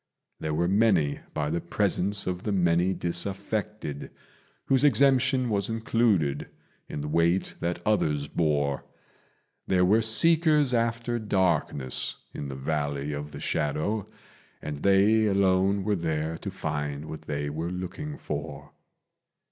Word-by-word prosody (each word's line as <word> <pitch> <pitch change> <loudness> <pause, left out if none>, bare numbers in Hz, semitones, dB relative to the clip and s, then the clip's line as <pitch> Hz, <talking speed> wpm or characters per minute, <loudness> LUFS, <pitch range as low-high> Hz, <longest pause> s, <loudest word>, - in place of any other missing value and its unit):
There 80 -1 -2
were 85 +2 +1
many 95 -7 +2 0.2
by 75 -1 -1
the 85 +1 -1
presence 100 +2 +1
of 90 -1 -3
the 105 - -2
many 90 -1 +2
disaffected, 95 -2 -2 0.6
Whose 135 0 +3
exemption 130 -1 +4
was 100 -2 +1
included 110 -10 +1 0.4
in 75 - -4
the 75 - -4
weight 85 +4 +1
that 85 0 -3
others 75 -9 +1
bore: 70 -3 0 0.8
There 90 -1 +3
were 105 +5 +4
seekers 150 +5 +4
after 115 0 0
darkness 95 - 0 0.2
in 70 - -5
the 70 - -6
Valley 75 +1 -2
of 75 +1 -6
the - - -8
Shadow, 80 +7 -1 0.5
And 75 -1 -5
they 100 +6 +4
alone 95 0 +2
were 105 +1 +1
there 80 -2 -2
to - - -5
find 75 0 -4
what 80 - -7
they 75 0 -2
were 80 +3 -3
looking 95 - -5
for. 75 -1 -6
90 Hz, 130 wpm, -27 LUFS, 75-110 Hz, 0.8 s, exemption